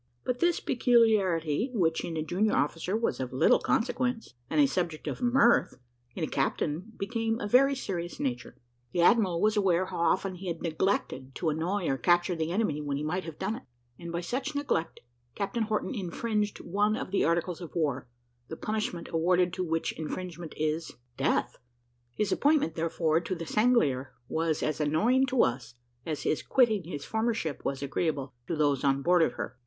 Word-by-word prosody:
But 250 0 -2
this 345 +2 +2
peculiarity, 215 - +2
which 165 -6 +1
in 165 -2 -4
a 155 - -1
junior 195 +7 +1
officer 165 +7 0
was 230 - -1
of 130 -1 -3
little 130 - +4
consequence, 245 - -1 0.2
and - - +1
a 290 - +7
subject 175 - -2
of - - -4
mirth, 240 -1 +4 0.4
in - - -3
a - - 0
captain 155 +9 -2
became 225 +2 -1
of 205 - -3
a - - -18
very 275 +2 +5
serious 175 -9 -4
nature. 125 -3 -3 0.4
The 175 - +2
admiral 190 -5 +4
was 215 +3 +2
aware 185 -3 +2
how - - -6
often 185 +3 +1
he 185 +1 -8
had 170 -2 -4
neglected 155 -6 -1
to 165 - 0
annoy 175 +5 -1
or 135 -1 0
capture 175 0 +3
the 160 -1 -2
enemy 180 -7 0
when 145 -1 -2
he 145 - -3
might 180 +5 -2
have 165 -2 -8
done 210 +4 -2
it; - - -12 0.4
and 170 -1 -7
by 170 +1 -2
such 260 - -3
neglect, 280 - -1 0.3
Captain 220 +3 -1
Horton 215 +5 -1
infringed 210 +1 -2
one 205 +4 +1
of 225 - -5
the 200 - +2
articles 170 +1 0
of 170 - -9
war, 140 -7 -1 0.4
the 160 - -7
punishment 215 -5 -3
awarded 175 +2 +2
to 185 - -2
which 165 -1 -1
infringement 170 0 -6
is 155 +1 -2 0.2
death. - - 0 0.6
His 210 -2 0
appointment, 290 - +2
therefore, 160 -1 +1
to 175 +2 -4
the 165 -1 -6
Sanglier 155 - +2
was 160 -1 -1
as 155 0 -1
annoying 225 - +3
to 255 -1 +3
us, 120 0 -2 0.3
as 155 -2 -3
his 155 - 0
quitting 220 -8 +2
his 145 -4 -6
former 225 +1 0
ship 160 - -4
was 140 0 -2
agreeable 140 -2 -2
to 170 - -1
those 145 -3 +1
on 140 0 +2
board 175 0 +4
of 160 - +2
her. - - -6
175 Hz, 190 wpm, -29 LUFS, 155-215 Hz, 0.6 s, a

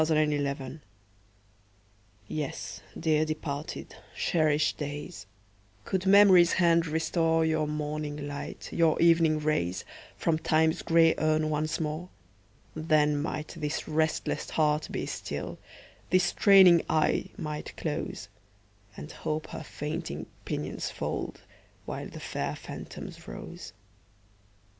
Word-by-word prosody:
DEPARTED 155 -2 +2
DAYS 140 0 -4 1.5
YES, 145 -8 -4 0.2
dear 155 -2 +2
departed, 155 -2 -5 0.2
cherished 155 -2 +2
days, 145 - -6 0.6
Could 190 0 -1
Memory's 190 -3 +7
hand 170 -2 +3
restore 160 +1 +1
Your 155 -1 +1
morning 150 -1 -3
light, 145 0 -7
your 165 -2 +3
evening 165 -2 +5
rays, 150 - -1 0.3
From 160 -1 +1
Time's 160 +2 +2
gray 165 -1 +5
urn 155 0 +2
once 155 +1 -1
more, 160 +3 -3 0.7
Then 155 -2 +3
might 155 0 -3
this 150 -2 -4
restless 155 0 0
heart 150 -1 +1
be - - -3
still, - - -5 0.5
This 185 +1 +4
straining 190 -2 +7
eye 155 -1 +2
might 150 -1 -5
close, 150 - -4 0.7
And 75 - -8
Hope 155 0 -4
her - - -5
fainting 155 +2 -5 0.2
pinions - - -3
fold, - - -4 0.4
While - - -5
the - - -9
fair - - -3
phantoms - - -9
rose. 90 - -8
155 Hz, 110 wpm, -29 LUFS, 150-165 Hz, 1.5 s, Memory's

